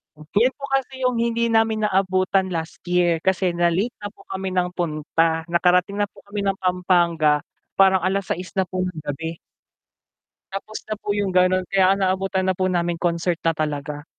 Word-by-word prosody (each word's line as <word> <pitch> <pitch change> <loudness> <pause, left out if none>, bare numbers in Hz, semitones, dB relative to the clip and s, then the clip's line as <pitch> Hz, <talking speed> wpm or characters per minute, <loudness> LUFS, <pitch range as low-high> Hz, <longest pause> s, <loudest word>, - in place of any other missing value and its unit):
Yun 205 - +1
po 280 - -16
kasi 265 -1 -1
yung 250 -2 +1
hindi 235 0 +1
namin 225 -1 +2
naabutan 190 -1 +2
last 165 -3 -5
year, 175 -2 +2
kasi 185 +1 +1
na-late 175 +6 +1
na 205 - -5
po - - -16
kami 190 0 -3
ng 180 -1 0
punta, 165 -1 0
nakarating 180 +3 +2
na 205 - +2
po - - -19
kami 205 - -3
ng 195 -1 0
Pampanga, 175 -5 +2 0.3
parang 190 -1 +5
6:00 185 -1 -2
na 190 - +3
po 185 0 -5
ng 180 -2 -2
gabi. 160 +3 -4 1.2
Tapos 215 +2 -5
na 215 - -3
po - - -18
yung 200 -2 0
ganun, 185 0 +3
kaya 190 -1 +4
ang 200 - -3
naabutan 190 0 0
na 190 - +2
po 185 - +1
namin 175 -1 0
concert 170 0 0
na 165 - +2
talaga. 145 0 -3
185 Hz, 180 wpm, -22 LUFS, 170-195 Hz, 1.2 s, parang